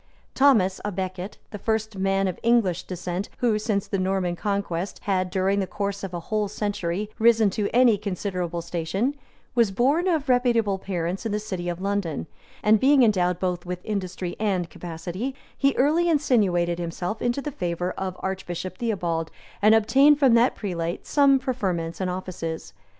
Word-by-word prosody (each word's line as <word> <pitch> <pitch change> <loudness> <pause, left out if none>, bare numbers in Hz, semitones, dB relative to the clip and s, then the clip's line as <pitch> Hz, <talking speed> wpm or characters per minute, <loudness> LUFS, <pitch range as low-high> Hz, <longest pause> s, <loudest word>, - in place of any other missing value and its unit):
Thomas 220 -9 +4
à 210 - -1
Becket, 185 +1 -4
the 205 - -6
first 220 0 -1
man 195 0 +1
of 185 - -4
English 225 -7 +2
descent 180 +2 -4
who, 225 -3 +1
since 210 -2 -1
the 195 - -1
Norman 185 -2 0
conquest, 195 -2 -2
had, 185 -2 0
during 190 +1 +1
the 190 - -1
course 200 0 -3
of 195 - -4
a 175 - -4
whole 210 +4 -1
century, 205 -1 -3
risen 225 -2 +5
to 205 +1 -1
any 240 -4 +4
considerable 180 -4 -3
station, 175 - -1 0.4
was 235 -4 +3
born 275 - +2
of 315 -5 +1
reputable 235 -6 +2
parents 180 -1 -3
in 225 - -2
the 210 - 0
city 185 -5 -4
of 175 0 -4
London; 195 - -1 0.4
and 215 0 +5
being 270 +1 +5
endowed 180 -5 +2
both 180 -2 -1
with 180 0 -6
industry 185 -4 -3
and 190 -6 0
capacity, 175 +9 -5 0.2
he 275 0 +2
early 320 +6 +3
insinuated 195 - +2
himself 175 +4 -4
into 245 +2 0
the 295 +1 -4
favor 175 -4 -2
of 185 -1 -4
Archbishop 185 0 -4
Theobald, 175 -8 -1 0.3
and 215 +2 +6
obtained 275 +7 +5
from 270 -5 +4
that 235 +2 +4
prelate 170 -4 -3
some 280 -2 +4
preferments 190 - -2
and 185 - 0
offices. 165 - -5
195 Hz, 165 wpm, -25 LUFS, 180-225 Hz, 0.4 s, and